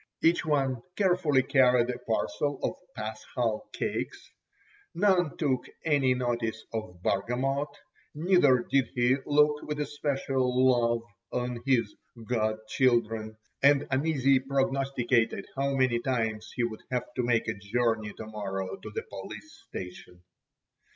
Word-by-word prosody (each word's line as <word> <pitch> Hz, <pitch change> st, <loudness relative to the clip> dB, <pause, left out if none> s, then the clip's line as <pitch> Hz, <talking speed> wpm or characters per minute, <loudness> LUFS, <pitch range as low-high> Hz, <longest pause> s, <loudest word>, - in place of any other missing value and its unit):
Each 165 Hz, +1 st, +4 dB
one 135 Hz, -5 st, +1 dB
carefully 175 Hz, -9 st, +3 dB
carried 125 Hz, -3 st, +4 dB
a 125 Hz, -, -6 dB
parcel 140 Hz, +5 st, -1 dB
of -, -, +1 dB, 0.2 s
paschal 110 Hz, +1 st, -3 dB
cakes. -, -, -4 dB, 0.6 s
None 180 Hz, -4 st, +2 dB
took 135 Hz, -5 st, 0 dB, 0.2 s
any 140 Hz, -5 st, +3 dB
notice 120 Hz, -3 st, -2 dB
of 90 Hz, -6 st, -5 dB
Bargamot, 130 Hz, +8 st, 0 dB, 0.5 s
neither 150 Hz, -7 st, +4 dB
did 135 Hz, -2 st, +2 dB
he 125 Hz, +1 st, +3 dB
look 150 Hz, 0 st, +4 dB
with 150 Hz, -1 st, -4 dB
especial 135 Hz, -3 st, +1 dB
love 120 Hz, -1 st, +2 dB, 0.3 s
on 125 Hz, -1 st, -2 dB
his 115 Hz, -6 st, +2 dB, 0.3 s
"god 110 Hz, -3 st, +1 dB
children," 110 Hz, -3 st, +1 dB, 0.2 s
and 140 Hz, 0 st, +5 dB
uneasily 135 Hz, -1 st, +3 dB
prognosticated 135 Hz, -5 st, 0 dB
how 140 Hz, 0 st, 0 dB
many 130 Hz, -3 st, +2 dB
times 115 Hz, -4 st, -2 dB
he 120 Hz, -, 0 dB
would 110 Hz, -2 st, -3 dB
have 125 Hz, -1 st, -3 dB
to -, -, +1 dB
make 120 Hz, -2 st, +1 dB
a -, -, 0 dB
journey 110 Hz, +1 st, -1 dB
to 110 Hz, -, -8 dB
morrow 100 Hz, -, -4 dB
to 190 Hz, -, -9 dB
the 450 Hz, -, -4 dB
police 315 Hz, -8 st, -9 dB, 0.2 s
station. 90 Hz, -1 st, -8 dB
125 Hz, 130 wpm, -29 LUFS, 115-140 Hz, 0.6 s, and